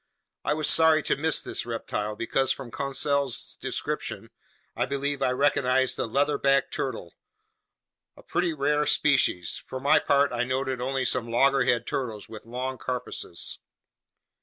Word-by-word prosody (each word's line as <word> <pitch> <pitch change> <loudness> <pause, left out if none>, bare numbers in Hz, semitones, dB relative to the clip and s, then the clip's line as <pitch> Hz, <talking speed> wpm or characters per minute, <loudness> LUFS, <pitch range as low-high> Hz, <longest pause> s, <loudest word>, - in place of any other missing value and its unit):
I 150 - 0
was 155 -1 +1
sorry 160 -1 +6
to - - +1
miss 160 +2 +2
this - - -2
reptile, 105 -2 -4
because 130 +4 0
from 130 -4 -5
Conseil's 140 -1 -1
description, - - -4 0.4
I 120 +2 -1
believe 140 +1 -2
I 130 - +2
recognized 130 -1 +2
the - - -2
leatherback 140 +1 +1
turtle, - - -4 1.0
a - - -15
pretty 175 -1 0
rare 150 0 0
species. 130 - +2
For 130 - -6
my 145 +4 +4
part, 140 0 +2
I 120 0 0
noted 130 0 -2
only 130 +1 -1
some 120 -2 0
loggerhead 125 -1 +2
turtles 115 -6 -4
with 110 0 -11
long 130 +2 -4
carapaces. 125 -8 -4
135 Hz, 140 wpm, -26 LUFS, 125-140 Hz, 1.0 s, sorry